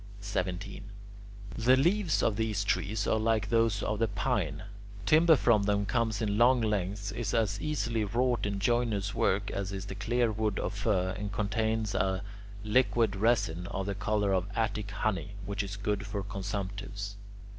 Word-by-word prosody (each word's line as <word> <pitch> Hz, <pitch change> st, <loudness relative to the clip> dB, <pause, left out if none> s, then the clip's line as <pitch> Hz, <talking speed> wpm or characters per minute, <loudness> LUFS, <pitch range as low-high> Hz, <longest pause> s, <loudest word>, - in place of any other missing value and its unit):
17. 95 Hz, -1 st, -3 dB, 0.7 s
The 125 Hz, +3 st, +4 dB
leaves 175 Hz, +5 st, +2 dB
of 110 Hz, -, +2 dB
these 105 Hz, -2 st, 0 dB
trees 100 Hz, +1 st, 0 dB
are 110 Hz, -, +2 dB
like 110 Hz, -1 st, +1 dB
those 115 Hz, -3 st, +2 dB
of 105 Hz, -1 st, -1 dB
the 115 Hz, -, +2 dB
pine; 95 Hz, -7 st, -1 dB, 0.4 s
timber 160 Hz, +4 st, +6 dB
from 115 Hz, -6 st, +3 dB
them 100 Hz, 0 st, +1 dB
comes 110 Hz, -1 st, 0 dB
in 105 Hz, 0 st, 0 dB
long 125 Hz, +2 st, +6 dB
lengths, 100 Hz, -2 st, -1 dB
is 110 Hz, 0 st, -2 dB
as 105 Hz, -3 st, +1 dB
easily 120 Hz, -7 st, -1 dB
wrought 120 Hz, +2 st, 0 dB
in 100 Hz, -1 st, -2 dB
joiner's 105 Hz, -2 st, 0 dB
work 100 Hz, +1 st, +1 dB
as 100 Hz, 0 st, -3 dB
is 95 Hz, -1 st, -5 dB
the -, -, -6 dB
clearwood 110 Hz, -1 st, 0 dB
of -, -, -2 dB
fir, 100 Hz, -3 st, 0 dB
and 105 Hz, -1 st, -4 dB
contains 110 Hz, +1 st, -1 dB
a 95 Hz, 0 st, 0 dB, 0.4 s
liquid 115 Hz, -1 st, +2 dB
resin, 95 Hz, -6 st, +1 dB
of 95 Hz, +1 st, -3 dB
the 100 Hz, -, -2 dB
colour 105 Hz, 0 st, 0 dB
of 95 Hz, 0 st, +1 dB
Attic 105 Hz, -2 st, -1 dB
honey, 100 Hz, -1 st, -2 dB
which 100 Hz, +1 st, -2 dB
is 100 Hz, 0 st, -5 dB
good 105 Hz, 0 st, -1 dB
for 100 Hz, -1 st, -3 dB
consumptives. 100 Hz, +1 st, -5 dB
105 Hz, 165 wpm, -30 LUFS, 100-115 Hz, 0.7 s, timber